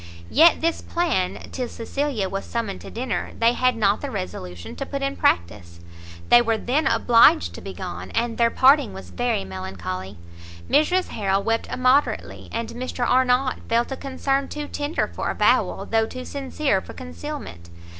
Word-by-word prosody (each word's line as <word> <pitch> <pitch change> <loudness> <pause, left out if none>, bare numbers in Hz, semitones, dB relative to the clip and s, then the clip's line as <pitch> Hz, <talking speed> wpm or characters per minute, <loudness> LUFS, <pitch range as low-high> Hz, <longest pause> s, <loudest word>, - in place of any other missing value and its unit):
Yet 325 +4 +6
this 330 +1 0
plan, 330 - -1
till 255 -2 -3
Cecilia 235 -2 -2
was 195 +1 -4
summoned 230 -4 -4
to - - -9
dinner, 240 +1 -3
they 230 +1 +4
had 255 0 +2
not 205 -2 +2
the 285 - -4
resolution 90 - -6
to 275 - -3
put 275 -1 -4
in 275 0 -1
practice. 85 0 0 0.5
They 240 - +8
were 225 -1 +1
then 275 +8 0
obliged 230 - +5
to - - -9
be 95 - -8
gone, 90 0 -6
and 230 0 -1
their 235 0 +5
parting 265 -3 +4
was 190 - -10
very 245 - -1
melancholy. 95 0 -6 0.5
Mrs 360 +5 +2
Harrel 195 -2 0
wept 225 +1 0
immoderately, 255 +3 +1
and 230 0 -3
Mr 245 0 -3
Arnott 255 +1 +2
felt 235 +3 +1
a - - -1
concern 275 +1 -1
too 295 -1 -5
tender 290 +2 -2
for - - -4
avowal, - - +2
though 225 0 +1
too 255 +1 -7
sincere 275 -6 -1
for - - -11
concealment. 85 +1 -8
235 Hz, 165 wpm, -23 LUFS, 190-270 Hz, 0.5 s, They